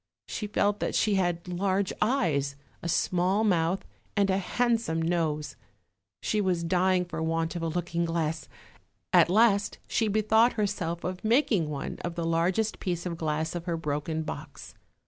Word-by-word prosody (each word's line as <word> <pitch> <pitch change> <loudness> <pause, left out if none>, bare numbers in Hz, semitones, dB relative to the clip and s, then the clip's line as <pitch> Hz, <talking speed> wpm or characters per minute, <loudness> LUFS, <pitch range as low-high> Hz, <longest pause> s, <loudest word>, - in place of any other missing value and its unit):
She 210 - -4
felt 205 0 +1
that - - -1
she 215 - +2
had 175 -2 0
large 190 +2 0
eyes, 155 - +1 0.3
a 170 - -3
small 185 +5 +2
mouth, 180 -2 +1 0.3
and 200 -1 +3
a 190 - +2
handsome 225 -4 0
nose; 160 -3 -1 0.7
she 215 - +1
was 180 -3 0
dying 180 +1 +2
for 175 - -5
want 165 +1 -1
of 170 - -3
a 165 - -1
looking 170 +1 -1
glass. 160 -1 -2 0.6
At - - +6
last 205 0 +3
she 225 - +1
bethought 220 +3 +3
herself 180 -6 -2
of 180 0 -4
making 220 - +2
one 145 -2 -5
of 175 -1 -3
the 170 - -2
largest 175 +6 +1
piece 175 -3 -3
of 175 -2 -2
glass 160 0 -2
of 175 -1 -5
her 170 -2 -1
broken 155 +1 -2
box. 155 -1 -8
175 Hz, 165 wpm, -28 LUFS, 165-200 Hz, 0.7 s, At